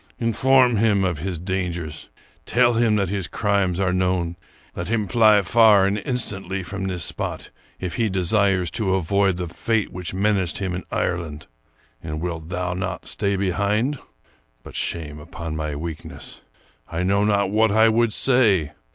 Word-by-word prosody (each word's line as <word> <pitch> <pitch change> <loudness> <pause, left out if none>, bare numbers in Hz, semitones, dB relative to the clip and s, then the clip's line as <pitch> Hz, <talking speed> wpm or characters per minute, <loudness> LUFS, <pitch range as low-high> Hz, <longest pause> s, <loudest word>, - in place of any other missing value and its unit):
Inform 125 +1 +3
him 100 -2 +3
of 90 -5 -1
his 90 +2 -3
dangers; 90 -3 -4 0.4
tell 120 0 +3
him 115 -2 +2
that 100 -4 0
his 100 -3 -2
crimes 100 -2 0
are 95 -2 +1
known; 90 -2 0 0.4
let 85 +2 -4
him 110 -3 0
fly 110 -3 +5
far 105 -2 +5
and 100 +2 0
instantly 100 -5 -3
from 95 +1 -5
this 90 -3 -3
spot, - - -4 0.3
if 90 -2 -4
he 115 -2 +1
desires 95 -1 +1
to 95 0 0
avoid 95 +1 +1
the 90 -1 -3
fate 110 +5 -1
which 90 -2 -4
menaced 95 -2 0
him 95 -3 -2
in 90 - -4
Ireland. 85 -4 -2 0.3
" - - -37
And 75 -1 -4
wilt 80 -1 -5
thou 90 0 -2
not 90 -1 -4
stay 100 -1 -1
behind? 100 +8 0 0.6
But - - -12
shame 75 -3 -3
upon 80 0 -7
my 75 -1 -3
weakness! 80 +1 -7 0.5
I 85 +2 -2
know 100 +2 +2
not 100 -2 +2
what 110 0 +3
I 110 +2 +5
would 115 0 +2
say. 105 - +2
95 Hz, 165 wpm, -22 LUFS, 90-105 Hz, 0.6 s, fly